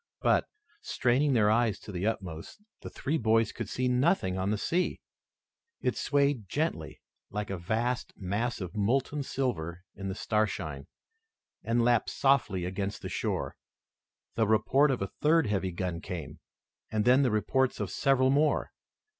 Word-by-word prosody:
But, - - +3 0.3
straining 130 +4 +1
their 105 -3 +4
eyes 110 -3 +2
to - - -9
the 95 +2 -2
utmost, 90 - -4 0.2
the - - -7
three 155 +4 -2
boys 115 -1 +3
could 115 -3 -6
see 125 +3 -1
nothing 125 - +2
on 95 +1 -1
the 105 - +1
sea. 175 - 0 0.8
It - - 0
swayed 140 -8 +1
gently 80 - -2 0.3
like 105 -1 -4
a 95 - -2
vast 115 +8 -1
mass 105 +5 -2
of 90 +2 -6
molten 130 +7 +1
silver 90 - -3
in 95 - -6
the 95 - -3
starshine, 100 -12 -1 0.8
and 115 +1 +1
lapped 120 -1 +3
softly 120 -10 +2
against 95 +2 -4
the - - -4
shore. - - -2 0.8
The 110 -2 +1
report 135 +7 +4
of 130 -7 0
a 100 - -5
third 160 0 +4
heavy 95 -3 -1
gun 85 -1 -3
came, 85 -6 -6 0.5
and 105 -1 0
then 130 +3 +6
the 130 - +3
reports 125 +4 +1
of 100 -4 -3
several 130 +4 +3
more. 145 +2 +2
110 Hz, 155 wpm, -29 LUFS, 95-130 Hz, 0.8 s, then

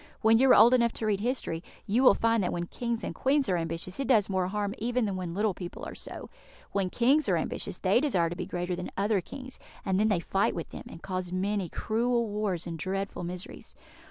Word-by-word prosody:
When 225 +1 +5
you 265 +1 +5
are - - +8
old 240 +2 +7
enough 235 -2 +3
to 225 - -3
read 205 -2 +1
history, 215 -8 -2 0.2
you 220 +5 +2
will 265 - +7
find 230 -1 +2
that 180 - 0
when 175 0 -2
Kings 235 +4 -3
and - - -3
Queens 275 +1 +2
are 185 - +2
ambitious, 170 +3 -3
it 275 - -1
does 215 -6 +3
more 185 -1 +1
harm 205 +1 -2
even 245 +1 0
than 200 -2 -2
when 180 -2 -4
little 210 0 +1
people 175 -1 -7
are - - -7
so. - - -6 0.4
When 195 -2 0
Kings 270 +9 +3
are - - +3
ambitious, - - -3
they - - +3
desire 185 - +2
to - - -3
be - - -5
greater 175 0 -2
than 180 0 -5
other 200 0 +2
Kings, 260 +7 -9 0.3
and 190 0 +1
then 215 - +3
they 200 -5 +2
fight 195 +3 0
with 170 - -5
them, - - -8
and 165 - -11
cause 185 -2 -3
many 190 0 -1
cruel 235 +5 0
wars 205 -5 -2
and 165 -2 -5
dreadful 195 +1 -3
miseries. 180 +1 -7
200 Hz, 235 wpm, -29 LUFS, 180-235 Hz, 0.4 s, are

